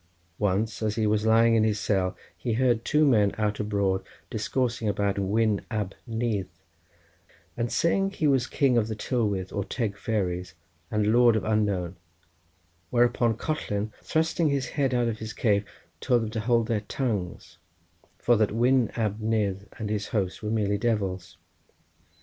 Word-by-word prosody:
Once 105 +3 0
as 105 -1 0
he 110 -1 +1
was 105 +1 +1
lying 115 +1 +5
in 110 -1 +4
his 110 -1 +1
cell 95 -3 0 0.2
he 110 +7 -3
heard 120 -1 +2
two 150 +1 +3
men 105 -7 +3
out 105 -1 -1
abroad 100 -2 0 0.3
discoursing 120 +1 -1
about 100 0 0
Wyn 105 +1 +1
Ab 105 -4 -2
Nudd, 115 -4 -1 1.1
and 115 0 -2
saying 195 +4 +2
that 195 - -14
he 155 - -1
was 135 -4 +3
king 130 -4 +2
of 110 - -1
the 110 - -3
Tylwyth 105 -5 -1 0.2
Teg 115 -5 -1
or - - -21
Fairies, 90 -7 -2 0.3
and 105 0 +1
lord 120 -1 +5
of 110 - 0
Unknown, 100 -5 0 0.9
whereupon 120 -1 +2
Collen 110 -9 -2
thrusting 160 0 +1
his 140 -2 -1
head 135 -3 0
out 120 -1 +2
of 110 -1 -3
his 110 0 -6
cave 105 -3 +1 0.3
told 120 -2 +2
them 110 - -4
to 110 - -3
hold 115 +1 +2
their 110 -3 0
tongues, 105 -5 -4 0.6
for 120 - +3
that 110 -1 +2
Wyn 120 +2 +3
Ab 110 -2 -1
Nudd 105 -3 -1
and 105 -2 -4
his 105 -1 -2
host 95 -4 -2
were 105 - -3
merely 105 -2 0
devils. 100 -6 -2
110 Hz, 165 wpm, -27 LUFS, 100-120 Hz, 1.1 s, lying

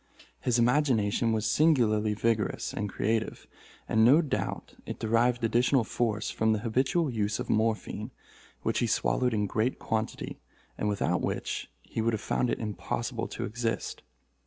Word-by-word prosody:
His 125 -2 +1
imagination 120 -3 +2
was 110 -1 0
singularly 110 -6 +3
vigorous 110 -1 0
and 105 0 -2
creative; 110 +3 -1 0.4
and 110 - +3
no 140 +9 +6
doubt 145 - -3
it - - -4
derived 115 +2 +1
additional 120 +3 +3
force 110 -1 -1
from 110 0 +2
the 110 - 0
habitual 130 +7 +1
use 105 -3 -1
of - - -2
morphine, 110 0 0 0.5
which - - 0
he - - +1
swallowed 125 -1 +1
in 105 -1 +1
great 110 +5 0
quantity, 110 0 -3 0.4
and 105 - -1
without 100 - 0
which - - -3
he - - -4
would 115 +1 +1
have 110 - -1
found 125 - 0
it - - 0
impossible 105 -3 -3
to - - -4
exist. 115 +1 -3
115 Hz, 155 wpm, -29 LUFS, 110-125 Hz, 0.5 s, no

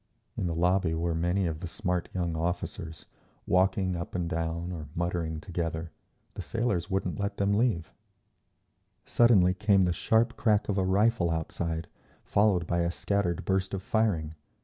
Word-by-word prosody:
In 90 - -1
the 85 - -2
lobby 90 0 +2
were 85 +1 -1
many 90 +4 +1
of 80 -2 -2
the 90 - -5
smart 90 -1 -2
young 85 -3 -2
officers, 80 -1 -4 0.4
walking 95 0 +2
up 85 +1 -5
and 90 -2 -1
down 85 +1 -2
or 80 -4 -6
muttering 85 -2 -2
together; 80 -1 -4 0.4
the - - -6
sailors 110 -7 -1
wouldn't 95 -2 -1
let 100 0 -2
them 100 0 +2
leave…. 105 -8 0 1.1
Suddenly 100 -7 +5
came 100 0 +3
the 90 -1 +2
sharp 115 +6 +2
crack 105 -3 +2
of 100 -1 +1
a - - +2
rifle 100 -1 +2
outside, 80 0 -2 0.4
followed 100 -4 +2
by 85 +1 0
a 85 0 +1
scattered 90 -1 -1
burst 95 0 0
of 95 - -5
firing. 100 -9 0
90 Hz, 160 wpm, -29 LUFS, 85-100 Hz, 1.1 s, Suddenly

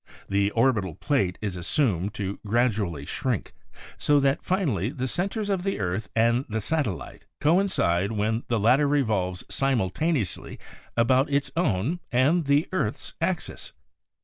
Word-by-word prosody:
The 100 0 +2
orbital 110 - +2
plate 100 -12 0
is 100 -4 -2
assumed 100 - 0
to 100 -1 -4
gradually 105 - 0
shrink, - - -2 0.5
so 145 -1 +4
that 140 +2 +2
finally 140 - 0
the 130 -2 -3
centers 200 - -2
of 195 -3 0
the 195 +1 -2
earth 95 +2 -2
and 115 +2 +3
the 110 0 -1
satellite 130 - -3
coin 175 +7 +3
cide 90 - +1
when 110 +1 0
the 115 -2 +1
latter 125 +7 +4
revolves 105 -11 0
simultaneously 135 - -1 0.4
about 130 +4 +3
its 140 -1 0
own 150 - 0
and 145 +7 +3
the 145 +2 +3
earth's 175 - -2
axis. - - -3
120 Hz, 140 wpm, -26 LUFS, 100-145 Hz, 0.5 s, so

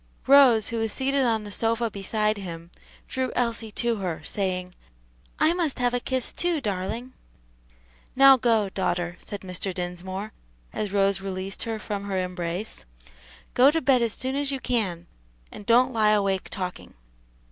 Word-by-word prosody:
Rose, 260 -6 +6
who 230 - -2
was 225 -1 -1
seated 275 +1 0
on 225 -2 +1
the 205 - -8
sofa 230 +2 0
beside 210 +2 -1
him, 170 -3 -8 0.4
drew 260 -1 -2
Elsie 230 -2 -1
to 235 -2 0
her, 175 -5 -4
saying, 185 0 -2 0.6
"I 310 +2 +4
must 340 -5 -1
have 245 -1 +1
a 245 - +1
kiss, 260 0 -2
too, 345 -2 0
darling." 225 +3 -3 1.0
"Now 270 0 +8
go, 225 -5 +2
daughter," 175 -2 -1
said 205 - -8
Mr. 185 +1 -3
Dinsmore, 185 +3 -5 0.4
as 210 -2 -3
Rose 195 -1 +2
released 190 0 -5
her 225 -1 -2
from 205 -2 -5
her 195 -1 -2
embrace, 180 - -4 0.7
"go 255 +3 +6
to 325 +2 +1
bed 265 -4 +3
as 230 -3 +1
soon 260 +2 -3
as 285 0 0
you 270 - -2
can, 195 -10 -1 0.5
and 205 - -11
don't 250 +2 +4
lie 215 -2 +3
awake 195 -2 0
talking." 185 -3 -6
215 Hz, 160 wpm, -25 LUFS, 190-245 Hz, 1.0 s, Now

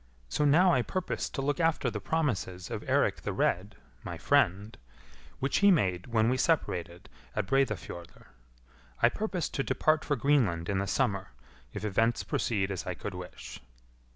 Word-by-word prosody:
So 150 - +1
now 170 +5 +5
I 125 - +3
purpose 185 +8 -3
to 135 - -4
look 145 +4 0
after 165 -7 +1
the 105 - -4
promises 100 - -2
of - - -3
Eirik - - +2
the - - -3
Red, - - 0 0.3
my 85 - -5
friend, 105 -2 +2 0.6
which 135 +1 0
he 200 - +6
made 95 - +2
when 110 -2 +2
we 130 +2 +2
separated 95 - -1 0.3
at 105 - 0
Breidafjordr. 110 -9 -2 0.8
I 120 - +8
purpose 185 - -2
to - - -2
depart 155 +2 +2
for 145 - 0
Greenland 115 - +1
in 100 -1 +1
the 100 - -2
summer, 100 -9 -1 0.4
if - - -5
events 115 +3 +1
proceed 100 -4 -1
as 95 -2 -4
I 90 - -2
could 100 +3 -6
wish." 90 0 -9
115 Hz, 165 wpm, -30 LUFS, 95-145 Hz, 0.8 s, I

